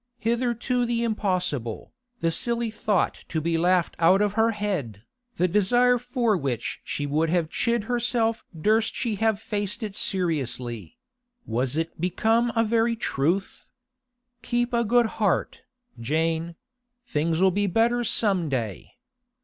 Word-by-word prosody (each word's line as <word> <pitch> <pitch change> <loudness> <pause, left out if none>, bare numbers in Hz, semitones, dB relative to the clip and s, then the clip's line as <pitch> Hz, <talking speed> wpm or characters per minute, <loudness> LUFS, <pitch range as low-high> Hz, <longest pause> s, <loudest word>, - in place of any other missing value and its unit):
Hitherto 240 +1 0
the 235 -1 0
impossible, 185 - -2 0.3
the 165 0 +2
silly 235 +4 0
thought 210 -3 0
to 160 - -1
be 165 +2 -1
laughed 175 +1 +2
out 180 +3 +5
of 205 -1 +1
her 225 +1 +3
head, 185 - -3 0.3
the 180 - +2
desire 245 +6 +3
for 240 -3 0
which 135 - -3
she 145 - -3
would 155 +3 0
have 170 -2 0
chid 235 -2 0
herself 235 -1 0 0.2
durst 220 +6 +2
she 235 -4 -1
have 220 -1 +1
faced 205 0 -3
it 205 -2 -5
seriously—was 165 - -3
it 165 0 -3
become 225 +6 +2
a 225 - +3
very 230 +1 +1
truth? 185 -2 -2 0.7
'Keep 240 0 -1
a 235 0 +2
good 240 +2 +3 0.2
heart, 200 -5 0 0.4
Jane; 160 +6 -1 0.5
things'll 165 +1 +1
be 205 +2 0
better 235 +5 +2
some 195 -8 +1
day. 115 -8 -4
205 Hz, 135 wpm, -25 LUFS, 165-235 Hz, 0.7 s, out